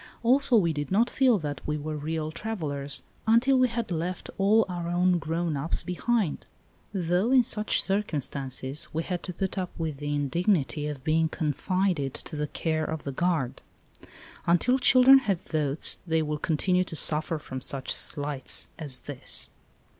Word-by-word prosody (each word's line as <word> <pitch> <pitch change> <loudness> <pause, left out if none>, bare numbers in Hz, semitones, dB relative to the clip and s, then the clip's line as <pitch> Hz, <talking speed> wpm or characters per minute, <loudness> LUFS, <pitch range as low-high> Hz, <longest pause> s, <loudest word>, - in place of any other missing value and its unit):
Also 255 +1 +4
we 170 -6 +2
did 145 -1 -4
not 230 +5 +3
feel 255 -4 +4
that 150 -5 -5
we 150 0 -1
were 155 +1 -4
real 155 +1 -3
travellers 145 -9 -4 0.2
until 250 +4 +4
we 255 - +5
had 230 -3 -4
left 175 +2 -3
all 215 +3 +4
our 175 -2 -4
own 175 +1 +2
grown 165 +1 -2
ups 145 +4 -2
behind, 195 -1 -1 0.5
though 180 +2 0
in 260 -1 +5
such 215 -1 +1
circumstances 145 -8 -2
we 160 +1 -1
had 180 -1 -3
to 180 - -6
put 190 +2 -3
up 180 -1 -3
with 160 -4 -3
the 145 +1 -4
indignity 150 0 0
of 145 -3 -6
being 160 +2 +2
con 155 -2 -1
fided 180 -6 0
to - - -7
the 150 0 -2
care 155 +1 -1
of 160 -1 -4
the 140 - -4
guard. 155 -4 -1 0.9
Until 225 +10 +3
children 260 +1 +7
have 200 -9 -1
votes 150 -2 +2
they 160 -1 +1
will 150 0 -3
continue 180 +4 +1
to 165 - -5
suffer 155 +1 +1
from 130 -3 -7
such 135 +1 -2
slights 145 -3 -1
as 140 -6 +1
this 145 -3 -2
165 Hz, 170 wpm, -27 LUFS, 150-195 Hz, 0.9 s, children